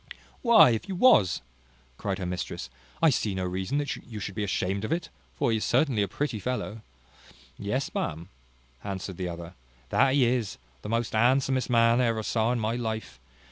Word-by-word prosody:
"Why, 235 - +7
if 115 - -2
you 190 - -2
was," 105 - +4 0.6
cries 100 -2 -2
her 95 - -4
mistress, 90 -7 -4 0.3
"I 165 - +7
see 105 -6 -1
no 95 - -2
reason 95 +9 -2
that 145 -1 -1
you 110 -3 -9
should 100 -1 -5
be 105 - -2
ashamed 100 0 -1
of 110 - -3
it; 165 -1 -1 0.3
for 115 - +1
he 110 - +2
is 110 - -3
certainly 125 -3 +2
a 100 - +1
pretty 130 +1 -3
fellow." 115 -1 -3 0.7
"Yes, - - -3
ma'am," 85 +4 -3 0.5
answered 95 -2 -5
the 90 -1 -3
other, 85 0 -7 0.4
"that 135 0 +3
he 135 -3 +5
is, 120 -3 0 0.2
the 105 - -7
most 115 0 -1
handsomest 130 +3 +2
man 115 0 +4
I - - +3
ever 110 -1 -1
saw 110 +1 +1
in 125 - 0
my 110 +1 -1
life. 110 - -4
110 Hz, 190 wpm, -27 LUFS, 95-125 Hz, 0.7 s, Why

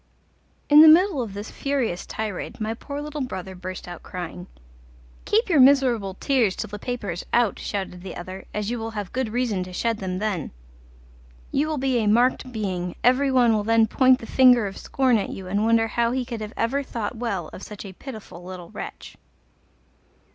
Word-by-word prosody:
In 295 +1 +9
the 320 - +10
middle 330 -1 +6
of 210 -5 -5
this 205 +2 -6
furious 260 -10 -2
tirade 215 -4 -5
my 220 +1 -2
poor 280 +5 -6
little 300 0 -5
brother 190 -7 -5
burst 185 0 -7
out 175 -1 -8
crying. 180 0 -7 0.8
"Keep 445 +3 +2
your 335 -7 +3
miserable 255 -8 +4
tears 240 -6 +1
till 215 - -5
the 210 0 -7
paper 235 -4 -4
is 175 - -5
out," 235 -4 +2
shouted 190 -3 -4
the 185 -1 -7
other, 185 +2 -8
"as 210 +1 -3
you 240 - -2
will 225 0 -4
have 205 -3 -5
good 255 -2 -1
reason 230 -4 -1
to 180 - -9
shed 225 +4 -1
them 185 -1 -3
then. 195 -6 -2 1.0
You 290 +3 +1
will 310 -1 -2
be 260 -2 +1
a 215 - 0
marked 245 +4 +2
being, 185 -6 -3
every 265 +3 +4
one 245 -3 +4
will 210 -1 +1
then 225 +1 +4
point 255 +3 +4
the 230 - -10
finger 250 -2 +5
of 195 -1 -5
scorn 255 -4 +1
at - - -3
you 190 - -7
and 200 +4 0
wonder 225 0 +3
how 235 +1 +1
he 260 -1 -1
could 235 -3 -6 0.2
ever 230 +5 0
have 280 - -6
thought 225 0 -4
well 200 -9 -3
of - - -9
such 210 0 -9
a 190 - -8
pitiful 215 -6 -10
little 180 -1 -9
wretch." - - -8
225 Hz, 200 wpm, -24 LUFS, 195-255 Hz, 1.0 s, the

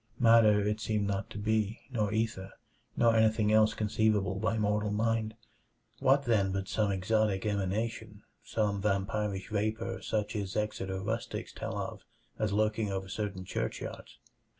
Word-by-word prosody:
Matter 115 -3 +6
it 105 +1 0
seemed 105 -1 0
not 100 -1 -2
to - - -8
be, 110 +1 0
nor 105 -5 0
ether, 110 -3 -2 0.4
nor 115 -1 +4
anything 110 -1 +3
else 110 0 +4
conceivable 105 -3 +1
by 110 +1 0
mortal 105 0 +1
mind. 110 +1 0 0.6
What, 135 +2 +4
then, 105 -6 +2
but 95 0 -2
some 105 -2 +1
exotic 100 +1 +1
emanation; 105 +1 -2 0.2
some 105 -3 -1
vampirish 100 0 -1
vapor 110 +2 -1
such 105 0 -2
as 100 -2 -3
Exeter 95 -3 -2
rustics 110 +4 -4
tell - - -5
of - - -5 0.4
as 110 -1 0
lurking 105 0 +1
over 95 0 -3
certain 95 -2 -4
churchyards? - - -5
105 Hz, 145 wpm, -31 LUFS, 100-110 Hz, 0.6 s, Matter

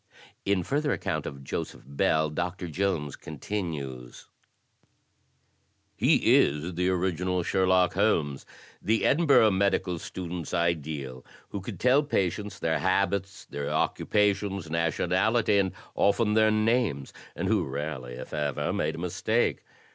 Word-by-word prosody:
In 100 -2 +1
further 145 - 0
account - - -3
of 70 -1 -8
Joseph - - -5
Bell, 75 +3 +1
Doctor 90 +3 -3
Jones 80 -4 -1
con 80 - -10
tinues: 70 -10 -5 1.7
"He - - +4
is 75 +5 +1
the 90 +2 0
original 90 0 0
Sherlock 95 0 +2
Holmes 80 -9 +1 0.2
— - - -25
the 110 - +2
Edinburgh 140 -8 +5
medical 95 -2 +1
students' 85 -2 -5
ideal 75 -6 -2
— - - -28
who 100 - -5
could 95 - -7
tell 130 +3 +4
patients 105 - -1
their 80 - 0
habits, 100 +1 0
their 70 0 -5
occupations, 100 -4 0
nationality, 95 +6 +2
and 95 -1 +1 0.2
often 105 +1 +2
their 110 0 +5
names, 110 - +1 0.2
and - - -2
who - - +2
rarely, 65 -5 -5
if 60 - -9
ever, 75 -3 -1
made - - -1
a - - -9
mistake. 90 +7 0
90 Hz, 130 wpm, -27 LUFS, 80-100 Hz, 1.7 s, Edinburgh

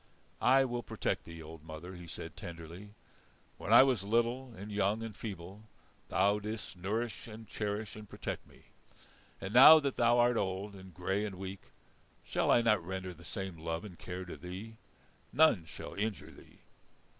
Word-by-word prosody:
"I 135 +1 +5
will 120 -1 -2
protect - - -2
thee, 85 -1 -9
old 80 0 -11
mother," 80 +3 -8
he 90 -1 -10
said - - -7
tenderly. 85 +5 -9 0.6
"When - - -4
I - - +10
was 130 -7 +2
little 120 +4 +1
and 100 +3 -7
young 105 +2 +1
and 110 -3 -6
feeble, 100 0 -7 0.4
thou 100 +2 +3
didst 105 0 -5
nourish 110 +7 -3
and 110 0 -10
cherish 105 +1 -3
and 105 -1 -10
protect - - -5
me; - - -19 0.8
and 95 +2 -5
now 150 +6 +11
that 140 -3 -2
thou 120 0 +4
art 120 0 +4
old 95 +1 -2
and 95 -1 -11
grey 95 +4 -1
and 105 -3 -4
weak, 95 +1 -7 0.6
shall - - 0
I 120 - +5
not 105 -6 +3
render 95 +1 -4
the 85 0 -15
same 95 -1 -5
love 80 +3 -3
and 90 -5 -11
care 90 0 -6
to 90 - -7
thee? 95 +5 -8 0.5
None 140 - +5
shall 80 - -8
injure 105 0 -3
thee." - - -17
100 Hz, 175 wpm, -33 LUFS, 90-115 Hz, 0.8 s, now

